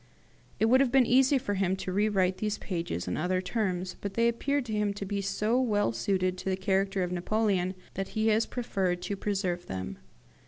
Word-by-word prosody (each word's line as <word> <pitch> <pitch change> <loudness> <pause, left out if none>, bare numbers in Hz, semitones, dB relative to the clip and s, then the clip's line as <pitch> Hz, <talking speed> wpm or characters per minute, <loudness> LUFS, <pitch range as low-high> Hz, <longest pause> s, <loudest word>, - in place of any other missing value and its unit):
It - - +4
would 250 +3 +5
have 265 -3 +2
been 265 -1 +5
easy 265 +3 +4
for 205 -5 -2
him 190 -1 +1
to 190 -1 -5
rewrite 195 -2 +2
these 210 0 -1
pages 165 - -4
in 90 - -2
other 180 +3 0
terms, 185 -2 -2
but 200 -1 -5
they 230 0 +3
appeared 275 +4 0
to 220 - -4
him 210 -1 0
to 200 - -5
be 200 +1 -2
so 215 +5 +1
well 205 - +1
suited 185 - 0
to 190 - -3
the 190 - 0
character 195 0 +1
of 180 - -3
Napoleon 185 0 0 0.2
that 195 0 -3
he 220 +1 +3
has 220 +1 +2
preferred 190 -7 -1
to 200 - -2
preserve 190 -3 -2
them." 95 -9 -5
195 Hz, 205 wpm, -29 LUFS, 185-220 Hz, 0.2 s, would